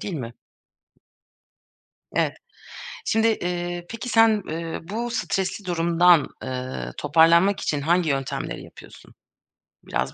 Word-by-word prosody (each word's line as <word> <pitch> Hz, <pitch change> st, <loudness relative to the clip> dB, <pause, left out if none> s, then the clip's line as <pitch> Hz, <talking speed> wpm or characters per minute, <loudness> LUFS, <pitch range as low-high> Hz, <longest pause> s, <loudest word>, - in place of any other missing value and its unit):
değil 195 Hz, -, -4 dB
mi? 120 Hz, -5 st, -5 dB, 1.8 s
Evet. -, -, 0 dB, 0.7 s
Şimdi, 225 Hz, +1 st, +2 dB
eee, 175 Hz, -3 st, -2 dB
peki 230 Hz, +2 st, -6 dB
sen, 225 Hz, -3 st, +4 dB
eee, 165 Hz, +1 st, -4 dB
bu 235 Hz, +3 st, -3 dB
stresli 195 Hz, -3 st, -2 dB
durumdan, 170 Hz, -2 st, +4 dB
eee, 130 Hz, 0 st, -5 dB
toparlanmak 165 Hz, +6 st, +4 dB
için 145 Hz, -, -1 dB
hangi 170 Hz, +3 st, +2 dB
yöntemleri 135 Hz, -1 st, -3 dB
yapıyorsun? -, -, -15 dB, 0.7 s
Biraz -, -, -2 dB
175 Hz, 105 wpm, -24 LUFS, 160-200 Hz, 1.8 s, sen